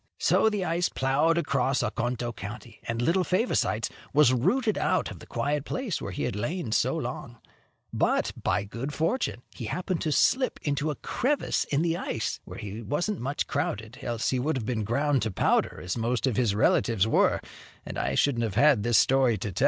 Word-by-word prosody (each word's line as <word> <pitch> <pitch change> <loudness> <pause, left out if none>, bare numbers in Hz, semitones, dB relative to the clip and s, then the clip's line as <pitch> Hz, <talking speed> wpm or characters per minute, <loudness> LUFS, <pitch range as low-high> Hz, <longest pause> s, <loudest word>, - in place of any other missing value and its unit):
So 220 - +3
the 205 -4 -2
ice 170 +2 +1
plowed 145 +5 +2
across 140 -5 +1
Oconto 120 +1 -2
County, 100 +4 -8
and 115 -1 -2
little 170 +9 +2
Favosites 180 - 0 0.2
was 140 -3 +5
rooted 210 - +2
out - - +1
from - - -9
the - - -13
quiet 145 0 -1
place 245 - -3
where 100 - -4
he 90 - -4
had - - -2
lain 140 - -3
so - - +2
long; - - -5 0.6
but, - - +1
by - - 0
good 120 +8 -5
fortune, 160 - -1
he 120 - -6
happened 180 - -2
to 155 - 0
slip 255 - +2
into 145 +1 0
a 150 - -2
crevice 275 - -1
in 145 +2 0
the 170 0 +1
ice, 110 - -3
where - - -9
he 105 +2 -6
wasn't 175 - -2
much 140 +4 -2
crowded, 115 -5 -3
else 120 -1 -1
he 130 - 0
would 140 +3 0
have 115 - -4
been 110 -2 -1
ground 140 +5 +1
to 110 - 0
powder, 95 - +1
as 90 0 -3
most 120 +2 0
of 130 -5 0
his 110 -4 +1
relatives 110 -1 +3
were, - - +3 0.5
and - - -5
I - - -1
shouldn't 125 -5 +2
have 110 -4 -2
had 140 -3 +5
this 120 +1 +3
story 130 -1 +4
to 105 - -4
tell. - - -5
130 Hz, 200 wpm, -27 LUFS, 115-160 Hz, 0.6 s, was